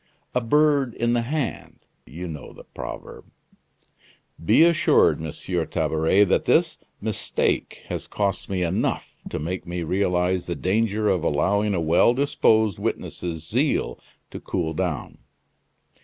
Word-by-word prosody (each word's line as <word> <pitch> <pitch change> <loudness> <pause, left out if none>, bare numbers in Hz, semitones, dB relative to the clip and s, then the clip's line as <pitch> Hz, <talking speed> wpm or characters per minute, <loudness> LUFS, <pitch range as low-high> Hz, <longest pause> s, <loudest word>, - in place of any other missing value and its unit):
'A 125 - +1
bird 140 0 +2
in 120 +1 +1
the 120 - +2
hand' 140 +1 -4 0.2
you 85 +8 -7
know 75 -3 -8
the - - -13
proverb." - - -8 1.2
"Be 110 - +6
assured, 170 - +4
Monsieur 80 -2 -3
Tabaret, 80 +6 +2
that 100 - +1
this - - +2 0.2
mistake - - -2
has - - -5
cost 100 -2 -2
me 95 -2 -1
enough 85 +2 -1
to - - -4
make 90 +3 -4
me 85 0 -3
realize 90 0 0
the 85 - -2
danger 105 +6 0
of 90 -5 +1
allowing 100 +7 +1
a - - 0
well 85 +9 +4
disposed 110 -7 +2
witness's 80 -2 -4
zeal - - 0 0.3
to - - -7
cool 80 -3 -2
down." 85 -4 -3
95 Hz, 135 wpm, -24 LUFS, 85-115 Hz, 1.2 s, Be